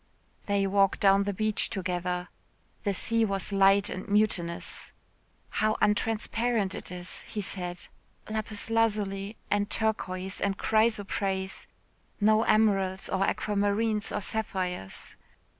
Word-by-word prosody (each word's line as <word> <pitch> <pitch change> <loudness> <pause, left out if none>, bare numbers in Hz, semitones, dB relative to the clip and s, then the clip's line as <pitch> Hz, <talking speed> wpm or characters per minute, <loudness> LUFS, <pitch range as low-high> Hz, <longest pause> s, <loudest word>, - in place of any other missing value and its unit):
They 200 -1 +2
walked 195 0 +3
down 195 0 +5
the 205 - 0
beach 215 +2 0
together. 180 -2 -2 0.6
The 200 -1 +1
sea 230 +4 +1
was 195 -1 0
light 195 0 +5
and 185 - -5
mutinous. 200 -5 0 0.6
"How 215 0 +1
untransparent 225 -1 +1
it - - -7
is," 180 0 -4
he 215 - -5
said, 180 -3 -3 0.4
"lapis 215 0 -3
lazuli 210 -2 0
and 205 0 +1
turquoise 190 -4 -2
and 200 0 0
chrysoprase 200 -3 0 0.5
no 215 +1 +4
emeralds 195 -4 +2
or 190 0 +1
aquamarines, 210 +1 0
or 210 - -2
sapphires." 185 - -3
200 Hz, 115 wpm, -28 LUFS, 190-215 Hz, 0.6 s, down